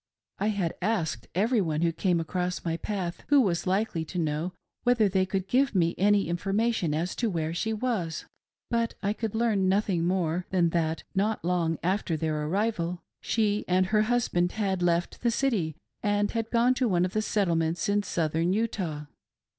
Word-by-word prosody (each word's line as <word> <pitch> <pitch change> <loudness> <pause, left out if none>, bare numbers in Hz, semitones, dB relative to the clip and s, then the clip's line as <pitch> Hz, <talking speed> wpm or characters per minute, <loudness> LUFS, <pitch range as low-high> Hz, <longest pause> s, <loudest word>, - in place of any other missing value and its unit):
I 205 - +1
had 200 -6 0
asked 170 - -1
every 220 +4 +2
one 160 -2 -1
who 170 - +3
came 175 +1 +1
across 180 +2 -2
my 165 -1 0
path, 180 -1 -4
who 290 -1 +5
was 185 -8 +1
likely 190 -3 0
to 180 - -7
know, 160 +1 -1 0.3
whether 245 -4 +3
they 190 -1 +1
could 190 0 -2
give 260 +2 +2
me 170 -2 +3
any 205 -1 +3
information 195 0 0
as 170 +4 -2
to 235 - +1
where 165 -3 -2
she 220 +6 -1
was; 215 -8 -2 0.5
but 230 -1 0
I 200 +1 +1
could 220 -1 -4
learn 215 -5 +2
nothing 190 -4 +1
more 180 -1 0
than 175 -3 +2
that, 165 -1 -1
not 205 0 0
long 170 -2 +1
after 185 -2 0
their 155 -1 -1
arrival, 180 -2 -1 0.2
she 210 -2 +1
and 185 +1 +3
her 210 +3 +2
husband 215 -6 +1
had 195 -4 -1
left 175 0 0
the 240 - +2
city 220 - 0 0.3
and 205 0 +1
had 225 -1 -2
gone 240 +2 +3
to 255 -1 +1
one 180 -2 +2
of 185 - -4
the 215 - +1
Settlements 170 -6 0
in 205 0 +2
Southern 165 -2 0
Utah. 185 -9 -2
185 Hz, 180 wpm, -28 LUFS, 170-215 Hz, 0.5 s, who